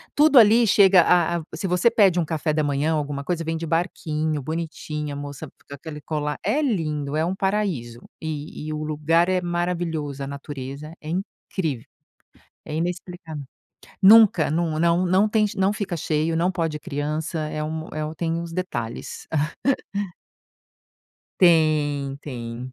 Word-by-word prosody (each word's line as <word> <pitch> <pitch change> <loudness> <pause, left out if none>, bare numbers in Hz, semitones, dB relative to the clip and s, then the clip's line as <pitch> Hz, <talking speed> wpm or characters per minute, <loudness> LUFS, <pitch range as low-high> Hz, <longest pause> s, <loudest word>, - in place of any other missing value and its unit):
tudo 295 -2 +7
ali 230 +2 +6
chega 195 -3 +6
a 170 0 +3
a, - - -6
se 180 +4 -3
você 180 +6 +3
pede 200 -6 +4
um 170 - +1
café 155 -1 -1
da 155 0 +1
manhã 145 +2 +1
alguma 145 -2 -2
coisa, 165 +3 -2
vem 165 0 -2
de 165 - -4
barquinho 155 -2 -1
bonitinho 150 -1 -4
a - - -5
moça 145 +2 -7
fica - - -29
com 140 - -6
aquela 150 +1 -9
colar, 150 -1 -3
é 230 +10 +1
lindo 155 - -1
é 160 - +2
um 180 +3 -1
paraíso 190 - -1 0.2
e 155 -1 -5
e 155 - -3
o 155 0 -3
lugar 155 +3 +2
é 185 -1 +1
maravilhoso 175 -5 -2
a - - -4
natureza 140 +1 -7
é 155 - -8
incrível 165 - -4 0.8
é 150 - -6
inexplicável, 170 -2 -4 0.6
nunca, 205 -6 +7
não 160 0 0 0.3
não 190 +4 +4
tem 215 0 +2
não 190 +1 +2
fica 205 -4 -3
cheio, 160 +1 0
não 175 +3 +1
pode 165 -4 -2
criança, 150 +3 -3
é 155 0 -3
um 160 +1 -4
é 155 0 -2
o 155 +1 -5
tem 165 0 -2
os 170 -1 -7
detalhes. 120 -11 -5 2.1
Tem 150 -5 +3
tem. 120 -1 -7
160 Hz, 160 wpm, -23 LUFS, 150-180 Hz, 2.1 s, tudo